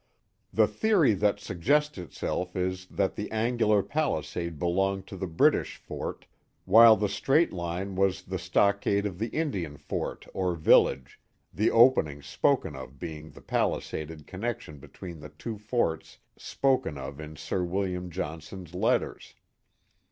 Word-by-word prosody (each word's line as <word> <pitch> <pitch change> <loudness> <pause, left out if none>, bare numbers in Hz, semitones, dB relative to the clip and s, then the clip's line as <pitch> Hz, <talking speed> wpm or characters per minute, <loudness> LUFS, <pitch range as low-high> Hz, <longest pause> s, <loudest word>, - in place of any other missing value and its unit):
The - - +4
theory 205 - +3
that 100 +1 +1
suggests 145 - 0
itself 90 +1 -4
is, 95 0 -2
that 95 0 -1
the 105 - -4
angular 110 -2 +2
palisade 85 - -2
belonged 95 +3 0
to 95 - -9
the 95 0 -4
British 80 -1 +2
fort, - - -6 0.4
while 110 +3 +8
the 105 0 0
straight 135 - +2
line 90 +2 -4
was 95 -1 +1
the 95 0 -4
stockade 100 +3 +2
of 95 -3 -4
the 115 - -1
Indian 95 - -3
fort - - -4
or 90 -2 0
village, 70 -4 +3 0.3
the 105 +3 +2
opening 95 - +4
spoken 75 +1 +1
of 65 0 -9
being 80 -2 -7
the - - -14
palisaded 75 -1 -2
connection 105 -6 -5
between 85 +4 -10
the 75 0 -10
two 110 -3 -7
forts 105 -7 -1 0.2
spoken 130 - 0
of 70 +2 -7
in 75 0 -8
Sir 90 +4 -2
William 90 0 -2
Johnson's 80 +1 -6
letters. 90 - -1
95 Hz, 140 wpm, -28 LUFS, 80-105 Hz, 0.4 s, while